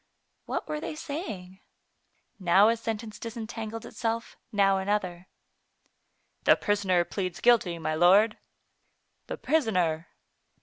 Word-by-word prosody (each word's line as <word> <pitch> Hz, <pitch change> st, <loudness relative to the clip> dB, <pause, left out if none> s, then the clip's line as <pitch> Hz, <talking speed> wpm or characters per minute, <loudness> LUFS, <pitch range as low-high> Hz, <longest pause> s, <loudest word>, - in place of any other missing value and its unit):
What -, -, -3 dB
were 300 Hz, -, -3 dB
they 305 Hz, -, -5 dB
saying? 210 Hz, -, -6 dB, 0.8 s
Now 190 Hz, +3 st, +5 dB
a 230 Hz, -, +3 dB
sentence 225 Hz, -1 st, -5 dB
disentangled 225 Hz, -1 st, -6 dB
itself, 230 Hz, 0 st, -3 dB, 0.2 s
now 195 Hz, -2 st, +3 dB
another. 190 Hz, -2 st, -2 dB, 1.2 s
"The -, -, +6 dB
prisoner 190 Hz, -4 st, +1 dB
pleads 180 Hz, 0 st, -4 dB
guilty, 225 Hz, -8 st, +3 dB
my 160 Hz, -1 st, -2 dB
lord." 195 Hz, +7 st, +5 dB, 0.9 s
"The -, -, -5 dB
prisoner! 180 Hz, -, +1 dB
205 Hz, 105 wpm, -28 LUFS, 180-225 Hz, 1.2 s, The